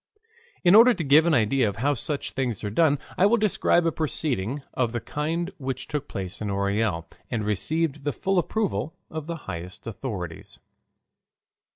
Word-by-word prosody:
In 175 Hz, 0 st, +6 dB
order 235 Hz, +3 st, +8 dB
to 175 Hz, -, -3 dB
give 150 Hz, +3 st, +5 dB
an 165 Hz, -, +4 dB
idea 120 Hz, 0 st, +3 dB
of 100 Hz, -, -6 dB
how 140 Hz, +6 st, +1 dB
such 145 Hz, +2 st, -3 dB
things 125 Hz, -6 st, -2 dB
are 105 Hz, -, -2 dB
done 145 Hz, +4 st, +3 dB, 0.2 s
I 190 Hz, -, +6 dB
will 235 Hz, +3 st, +4 dB
describe 200 Hz, -5 st, +2 dB
a 165 Hz, -, +3 dB
proceeding 140 Hz, -5 st, -2 dB
of 120 Hz, -2 st, 0 dB
the 120 Hz, -, -1 dB
kind 165 Hz, -, -2 dB
which 135 Hz, -1 st, -4 dB
took 145 Hz, -1 st, -3 dB
place 95 Hz, 0 st, -6 dB
in 105 Hz, -, -2 dB
Orel, 100 Hz, -3 st, 0 dB, 0.2 s
and 110 Hz, -4 st, -2 dB
received 150 Hz, -, -1 dB
the 145 Hz, -, 0 dB
full 190 Hz, +5 st, 0 dB
approval 190 Hz, -5 st, -1 dB, 0.2 s
of 155 Hz, -1 st, -5 dB
the 170 Hz, -, -3 dB
highest 90 Hz, +2 st, -7 dB
authorities. 100 Hz, -7 st, -6 dB
140 Hz, 175 wpm, -25 LUFS, 105-165 Hz, 0.2 s, order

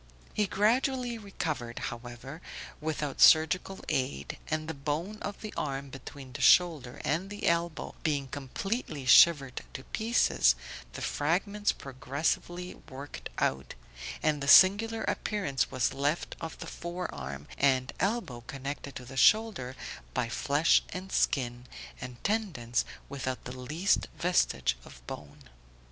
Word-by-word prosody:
He 210 Hz, -1 st, +1 dB
gradually 240 Hz, +4 st, +1 dB
recovered, 155 Hz, -, -4 dB
however, 120 Hz, +6 st, -6 dB, 0.4 s
without 150 Hz, -2 st, -3 dB
surgical 165 Hz, +4 st, +5 dB
aid, 70 Hz, -, -2 dB
and 155 Hz, 0 st, -2 dB
the 160 Hz, -, -3 dB
bone 155 Hz, +9 st, -3 dB
of 200 Hz, 0 st, -5 dB
the 215 Hz, -, -6 dB
arm 140 Hz, -1 st, -3 dB
between 135 Hz, 0 st, -10 dB
the -, -, -6 dB
shoulder 155 Hz, -9 st, +4 dB
and 180 Hz, +6 st, -1 dB
elbow 170 Hz, -1 st, 0 dB
being 145 Hz, -4 st, 0 dB
completely 145 Hz, -, -4 dB
shivered 135 Hz, 0 st, +6 dB
to 130 Hz, -, -6 dB
pieces, 225 Hz, -, +3 dB, 0.4 s
the -, -, -6 dB
fragments 200 Hz, +7 st, +1 dB
progressively 145 Hz, +7 st, -3 dB, 0.2 s
worked 140 Hz, +1 st, -8 dB
out, 65 Hz, 0 st, -1 dB, 0.5 s
and 150 Hz, -2 st, +2 dB
the 140 Hz, -, -3 dB
singular 215 Hz, +7 st, +7 dB
appearance 195 Hz, -11 st, -1 dB
was 130 Hz, +1 st, 0 dB
left 145 Hz, +4 st, -1 dB
of 165 Hz, -1 st, -5 dB
the -, -, -7 dB
fore 175 Hz, +1 st, -5 dB
arm 70 Hz, +2 st, -6 dB
and 130 Hz, -2 st, +3 dB
elbow 195 Hz, -, -1 dB
connected 140 Hz, +1 st, -6 dB
to 125 Hz, -, -7 dB
the 135 Hz, +2 st, -10 dB
shoulder 205 Hz, -, +4 dB, 0.4 s
by 125 Hz, -2 st, +1 dB
flesh 145 Hz, +6 st, +3 dB
and 185 Hz, +1 st, -6 dB
skin, 120 Hz, -2 st, 0 dB, 0.3 s
and 125 Hz, -1 st, -8 dB
tendons, 170 Hz, -, 0 dB, 0.2 s
without 130 Hz, -2 st, -4 dB
the 125 Hz, -, -7 dB
least 155 Hz, +10 st, +1 dB
vestige 65 Hz, -, +2 dB
of -, -, -14 dB
bone. 70 Hz, +2 st, -9 dB
145 Hz, 130 wpm, -30 LUFS, 130-185 Hz, 0.5 s, singular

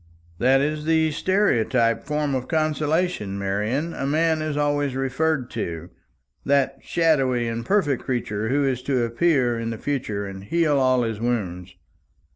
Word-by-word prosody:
"That 135 Hz, +2 st, +4 dB
is 150 Hz, +1 st, -2 dB
the 160 Hz, -1 st, +2 dB
stereotyped 125 Hz, -, +1 dB
form 150 Hz, -1 st, -1 dB
of 130 Hz, -1 st, -2 dB
consolation, 155 Hz, -, 0 dB
Marian, 105 Hz, +11 st, -1 dB
a 135 Hz, -, -3 dB
man 160 Hz, +2 st, +1 dB
is 155 Hz, -1 st, -2 dB
always 145 Hz, -2 st, 0 dB
referred 135 Hz, 0 st, -1 dB
to 85 Hz, +1 st, -5 dB, 0.5 s
that 140 Hz, -1 st, +1 dB
shadowy 135 Hz, -8 st, +1 dB
and 115 Hz, 0 st, -3 dB
perfect 145 Hz, -, +1 dB
creature 110 Hz, -4 st, -2 dB
who 140 Hz, +2 st, +2 dB
is 130 Hz, -2 st, -1 dB
to 130 Hz, -2 st, 0 dB
appear 120 Hz, -1 st, +1 dB
in 115 Hz, 0 st, -3 dB
the 115 Hz, -, -4 dB
future, 110 Hz, -7 st, -3 dB
and 95 Hz, -1 st, -8 dB
heal 155 Hz, +4 st, +1 dB
all 130 Hz, -1 st, +3 dB
his 110 Hz, -2 st, -3 dB
wounds. 95 Hz, -7 st, -3 dB
135 Hz, 150 wpm, -23 LUFS, 115-155 Hz, 0.5 s, That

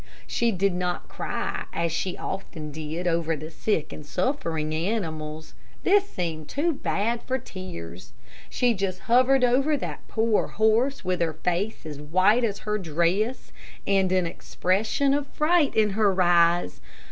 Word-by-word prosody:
She 235 Hz, -1 st, +1 dB
did 195 Hz, -1 st, +1 dB
not 180 Hz, 0 st, -2 dB
cry, -, -, -3 dB
as 170 Hz, 0 st, -1 dB
she 180 Hz, +3 st, -2 dB
often 160 Hz, -5 st, -5 dB
did 160 Hz, +3 st, -5 dB
over 165 Hz, -1 st, +1 dB
the 155 Hz, +2 st, -8 dB
sick 165 Hz, -3 st, -1 dB
and 155 Hz, -, -8 dB
suffering 160 Hz, -, -1 dB
animals. 160 Hz, -4 st, -3 dB, 0.3 s
This 400 Hz, +1 st, +4 dB
seemed 160 Hz, -4 st, -4 dB
too 325 Hz, +4 st, 0 dB
bad 230 Hz, -3 st, -1 dB
for 260 Hz, -, -1 dB
tears. 90 Hz, -, -9 dB, 0.4 s
She 245 Hz, -2 st, +2 dB
just 190 Hz, -2 st, -3 dB
hovered 255 Hz, +2 st, +4 dB
over 270 Hz, +5 st, +3 dB
that -, -, -6 dB
poor 225 Hz, -1 st, +1 dB
horse 220 Hz, +3 st, +1 dB
with 180 Hz, -1 st, 0 dB
her 165 Hz, -2 st, +1 dB
face 180 Hz, +7 st, -2 dB
as 150 Hz, -2 st, -7 dB
white 185 Hz, +10 st, +3 dB
as 205 Hz, -3 st, 0 dB
her 210 Hz, 0 st, 0 dB
dress, 180 Hz, -, 0 dB, 0.3 s
and 195 Hz, -2 st, +2 dB
an 185 Hz, -1 st, +2 dB
expression 205 Hz, +11 st, 0 dB
of 285 Hz, 0 st, 0 dB
fright 305 Hz, 0 st, +2 dB
in 215 Hz, -2 st, +3 dB
her 200 Hz, -2 st, +2 dB
eyes. 175 Hz, -, +3 dB
185 Hz, 150 wpm, -26 LUFS, 165-230 Hz, 0.4 s, This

